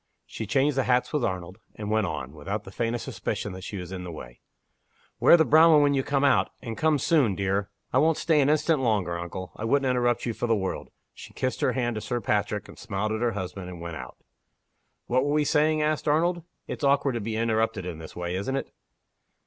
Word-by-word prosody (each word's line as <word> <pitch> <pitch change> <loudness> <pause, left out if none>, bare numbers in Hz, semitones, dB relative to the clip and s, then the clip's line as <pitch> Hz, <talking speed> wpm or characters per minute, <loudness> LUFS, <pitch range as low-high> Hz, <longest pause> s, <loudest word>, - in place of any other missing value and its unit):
She 110 - -6
changed 135 +4 +2
the 135 - +2
hats 125 +3 +1
with 150 -4 +1
Arnold, 95 -1 -3 0.2
and 105 0 -5
went 110 -2 +2
on, 70 -4 -5
without 95 +8 -4
the 95 - -11
faintest 115 +3 -2
suspicion 100 - -4
that 95 0 -9
she 100 - -5
was 90 -1 -7
in 95 -1 -5
the 90 - -6
way. - - -10 0.8
"Wear 170 - +7
the 160 - +4
brown 160 +3 +7
one 150 -1 +6
when 145 0 +3
you 135 - +2
come 140 +1 0
out 140 -2 +4
and 115 -3 -6
come 155 +2 +2
soon, 135 - +2
dear. 100 +1 -1 0.2
I 130 - +5
won't 160 +2 +3
stay 160 -3 +3
an 135 - +3
instant 155 0 +2
longer, 100 -9 0
uncle 90 +2 -6
I - - -6
wouldn't 135 +4 +2
interrupt 120 -1 +1
you 120 - -1
for 120 - -3
the 115 - +3
world." 95 -2 -3 0.2
She - - -12
kissed 130 - -2
her - - +2
hand 120 -2 0
to - - -3
Sir 120 +4 -2
Patrick, 105 -2 -1
and - - -13
smiled 105 -1 -2
at 110 +1 -2
her 120 -1 +1
husband, 95 -1 -5
and 90 -2 -8
went 85 -1 -6
out. 65 -4 -9 0.9
"What 130 +2 +2
were 145 +1 0
we 150 0 +3
saying?" 155 +1 +2
asked 155 0 -1
Arnold. 170 +4 +2 0.2
"It's - - -6
awkward 140 -1 +3
to 120 - -2
be 110 +1 -3
interrupted 110 -3 0
in 85 -3 -5
this 80 - -10
way, 90 0 -3
isn't 100 +8 -2
it?" 135 - -4
115 Hz, 235 wpm, -26 LUFS, 95-140 Hz, 0.9 s, Wear